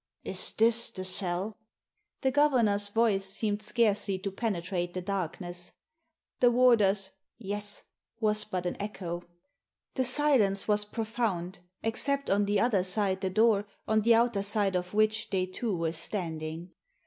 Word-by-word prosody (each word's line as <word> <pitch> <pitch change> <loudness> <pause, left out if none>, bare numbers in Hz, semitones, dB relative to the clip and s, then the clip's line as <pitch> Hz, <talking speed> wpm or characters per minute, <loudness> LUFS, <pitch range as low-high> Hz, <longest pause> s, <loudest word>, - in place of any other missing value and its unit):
"Is - - -2
this 230 +1 +2
the 185 0 -7
cell?" 190 +2 -3 0.6
The 265 - +1
governor's 235 -9 +3
voice 215 -2 +2
seemed 205 +1 -2
scarcely 210 -3 +1
to 195 +1 -5
penetrate 180 -4 -3
the 185 - -2
darkness. 175 -2 -4 0.7
The 245 - +5
warder's 210 -6 +4 0.3
Yes 205 -1 -4 0.2
" 230 - -51
was 215 -1 +2
but 185 -4 -4
an 175 - -3
echo. 180 -4 -5 0.7
The 260 - 0
silence 250 -7 +3
was 210 -1 +2
profound, 210 -5 -3 0.2
except 280 +4 0
on 200 +1 +3
the 205 0 +1
other 215 -6 +2
side 190 0 +2
the 190 - -1
door 210 0 +3 0.2
on 220 0 +2
the 230 +2 +5
outer 230 -3 +2
side 200 -1 +1
of 180 +2 -3
which 215 0 +1
they 185 -2 0
two 190 +1 -3
were 165 -1 -1
standing. 165 -1 -5
205 Hz, 150 wpm, -29 LUFS, 185-225 Hz, 0.7 s, The